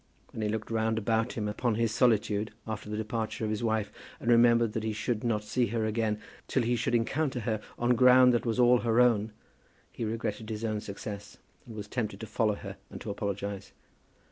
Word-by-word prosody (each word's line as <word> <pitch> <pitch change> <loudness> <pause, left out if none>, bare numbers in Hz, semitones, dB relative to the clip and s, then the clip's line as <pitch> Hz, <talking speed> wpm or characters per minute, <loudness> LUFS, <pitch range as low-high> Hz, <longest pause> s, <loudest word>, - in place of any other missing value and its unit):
When 110 - -6
he 105 - 0
looked 110 +1 -3
round 110 0 +1
about 110 +2 0
him 105 -2 -2
upon 110 +2 0
his 115 0 +1
solitude 110 -3 +2
after 110 -1 -5
the 105 - -3
departure 110 0 -3
of 110 - 0
his 110 +1 -2
wife, 110 -2 0 0.3
and 120 - +1
remembered 115 -1 +5
that 110 - -1
he 110 0 -2
should 110 +1 -2
not 110 -3 0
see 120 +3 0
her 110 +1 -1
again 110 -1 0 0.3
till 130 - +1
he 120 +1 +1
should 120 +1 0
encounter 130 +3 0
her 110 -1 -1 0.2
on 120 +1 +2
ground 125 +1 +7
that 120 - +1
was 115 0 -1
all 125 0 +6
her 115 0 +2
own, 110 -3 +4 0.6
he - - -5
regretted 110 0 -3
his 110 +1 -3
own 110 -1 -1
success, 105 0 -7 0.3
and 115 - -9
was 105 -1 -6
tempted 105 -4 -3
to - - -5
follow 110 -1 +1
her 100 -1 -8
and - - -8
to 105 - -4
apologize. 100 -1 -4
110 Hz, 210 wpm, -29 LUFS, 105-120 Hz, 0.6 s, ground